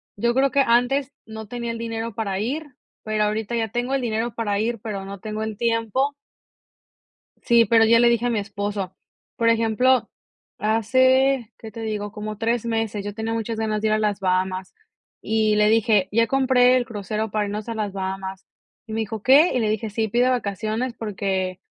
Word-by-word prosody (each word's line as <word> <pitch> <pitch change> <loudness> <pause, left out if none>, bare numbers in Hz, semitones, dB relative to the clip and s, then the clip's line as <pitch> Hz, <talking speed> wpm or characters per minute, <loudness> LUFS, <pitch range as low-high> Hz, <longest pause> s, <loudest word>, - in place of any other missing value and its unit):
yo 235 +4 +1
creo 270 +2 +3
que 280 - +3
antes 260 +3 +2
no 220 -1 -8
tenía 235 +1 -4
el 230 - -5
dinero 230 -1 -4
para 200 -4 -2
ir, 275 +5 -4 0.3
pero 215 -1 0
ahorita 215 +2 -2
ya 225 -1 0
tengo 245 +3 -2
el 275 - +1
dinero 230 0 -2
para 205 -3 -1
ir, 230 +1 -1
pero 205 -3 -5
no 200 0 -8
tengo 215 +2 -4
el 220 -2 -5
tiempo. 230 +4 0 1.3
Sí, 235 -1 +5
pero 225 -1 +5
ya 230 +1 +5
le 240 0 +5
dije 235 0 +1
a - - +2
mi 230 -3 0
esposo. 200 -2 -4 0.4
Por 230 -1 +2
ejemplo, 230 +3 +2 0.5
hace, 260 +3 +2
¿qué 220 - -10
te 230 - -8
digo? 210 -2 -3
Como 215 0 -6
3 230 +1 0
meses, 225 -3 -2
yo 205 - -4
tenía 220 +1 -3
muchas 225 0 -3
ganas 215 -1 -1
de 220 - +1
ir 215 - +2
a 215 - +2
las 210 -2 0
Bahamas, 185 0 -1 0.5
y 215 -1 +1
le 210 0 +4
dije: 215 -3 +3
"Ya 230 +2 +3
compré 255 -1 +4
el 250 - 0
crucero 215 -1 -4
para 210 0 0
irnos 210 +2 -5
a 230 - -3
las 210 -3 -3
Bahamas". 190 0 -5 0.4
Y 220 - -8
me 225 - -1
dijo: 220 0 -5
"¿Qué?" 285 +7 +6
Y 250 - +1
le 220 -2 +1
dije: 215 +1 -2
"Sí, 220 +1 -1
pide 240 +4 +2
vacaciones", 220 +1 -2
porque 190 -3 -2
220 Hz, 200 wpm, -23 LUFS, 210-235 Hz, 1.3 s, Qué